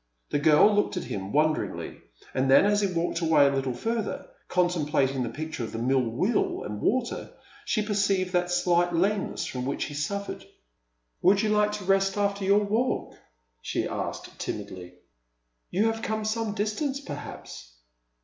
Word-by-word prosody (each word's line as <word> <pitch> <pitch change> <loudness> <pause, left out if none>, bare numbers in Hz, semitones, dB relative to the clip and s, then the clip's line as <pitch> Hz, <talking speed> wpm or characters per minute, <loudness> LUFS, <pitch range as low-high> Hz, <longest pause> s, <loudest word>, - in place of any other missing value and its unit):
The 145 - +1
girl 155 +7 +6
looked 205 -2 +1
at - - -2
him 95 0 -5
wonderingly, 155 +1 0 0.3
and 130 +1 +1
then, 135 - +7
as 205 0 +3
he 200 -2 +1
walked 165 -1 -1
away 160 -3 +5
a 140 - +4
little 135 -2 -1
further, 225 - -3 0.2
con 180 -1 +3
templating 145 -6 0
the 120 - -1
picture 155 -3 -5
of 115 0 -5
mill 130 +3 +2
wheel 125 - 0
and 105 0 -5
water, 250 -2 0 0.4
she 215 - +1
perceived 195 -3 +1
that 180 0 +1
slight 175 -1 +2
lameness 195 +4 0
from 125 -1 -4
which 140 +2 -2
he - - -5
suffered. 200 +8 -3 0.8
"Would 195 +3 +4
you 215 - +1
like 210 0 +2
to 210 -1 -4
rest 195 +1 +2
after 200 -1 0
your 200 +2 +4
walk?" 225 +5 -1 0.5
she - - -2
asked, - - -5
timidly. 90 -1 -6 0.4
" - - -50
You 200 +5 +1
have 225 0 -6
come 220 0 -2
some 215 -1 -1
distance, 260 +7 -1
perhaps 145 - -8
180 Hz, 170 wpm, -27 LUFS, 140-205 Hz, 0.8 s, then